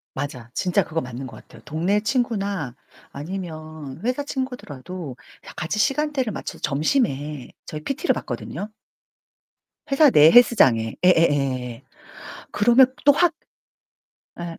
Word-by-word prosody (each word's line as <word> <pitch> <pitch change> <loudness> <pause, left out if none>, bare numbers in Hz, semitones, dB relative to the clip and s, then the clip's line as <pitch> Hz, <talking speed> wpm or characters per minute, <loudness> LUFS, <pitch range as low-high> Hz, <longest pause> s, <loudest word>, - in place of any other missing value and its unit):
맞아 130 -4 -5
진짜 185 +1 +1
그거 165 0 -3
맞는 125 +1 -7
것 - - -11
같아요. - - -16
동네 175 +7 0
친구나 200 - -1 0.4
아니면 155 -3 -7
회사 255 +4 -1
친구더라도 185 - -6 0.4
같이 175 +6 -2
시간대를 275 0 0
맞춰서 - - -7
점심에 150 - -1 0.2
저희 150 0 -7
PT를 280 +6 0
받거든요. 210 - -6 1.2
회사 285 0 +6
내 150 -2 +7
헬스장에 130 - +5
예예예. 135 -8 +2 0.7
그러면 240 +5 +5 0.2
또 285 - +9
확 340 +2 +3 1.1
예. 170 -1 -6
170 Hz, 265 characters per minute, -23 LUFS, 145-240 Hz, 1.2 s, 또